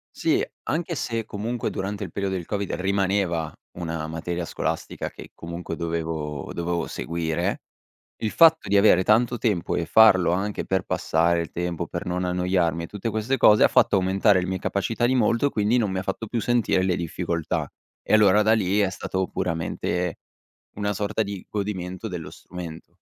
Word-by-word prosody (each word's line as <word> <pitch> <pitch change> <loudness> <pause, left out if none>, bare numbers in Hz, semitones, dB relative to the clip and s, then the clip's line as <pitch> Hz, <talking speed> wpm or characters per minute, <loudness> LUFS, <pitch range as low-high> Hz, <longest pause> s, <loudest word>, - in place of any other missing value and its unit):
Sì, - - +1 0.2
anche 170 +1 -2
se 115 -4 -2
comunque 110 +3 -3
durante 100 +1 -4
il - - -6
periodo 95 -1 -2
del 85 -3 -4
Covid 100 -1 -3
rimaneva 95 -4 0 0.3
una 80 -2 -3
materia 85 +2 -4
scolastica - - -3
che - - -12
comunque 85 0 -6
dovevo 80 -3 -3
dovevo 85 0 -2
seguire, 80 -1 -2 0.6
il 110 - -2
fatto 165 -1 +5
di 100 - +1
avere 100 -2 +6
tanto 120 +3 +3
tempo 105 -8 0
e 85 - -1
farlo 95 -4 +6
anche 100 +3 -2
per 95 -1 0
passare 85 +1 +1
il 85 - -3
tempo, 85 -1 -3
per - - -5
non 90 +1 -1
annoiarmi 90 -2 0
e - - -5
tutte 105 +4 -4
queste 110 +5 -1
cose, 105 -3 +6
ha - - +6
fatto - - +4
aumentare 95 +1 +3
le 90 - -3
mie 95 0 -2
capacità 110 +6 -1
di 130 +2 +2
molto, 115 +3 +2
quindi 105 +2 +1
non 105 -5 +1
mi 95 0 -1
fatto 100 +3 -4
più 115 0 -2
sentire 120 -6 +2
le 95 -2 +1
difficoltà. 85 -1 -2 0.4
E - - -1
allora 105 -1 +6
da 110 +1 +3
lì 100 -2 +2
è 100 - +2
stato 95 0 -3
puramente 90 0 -2 0.6
una 105 0 -1
sorta 105 +2 -1
di 100 -2 -6
godimento 100 0 -4
dello 85 -3 -6
strumento. 85 -3 -9
95 Hz, 175 wpm, -24 LUFS, 85-105 Hz, 0.6 s, avere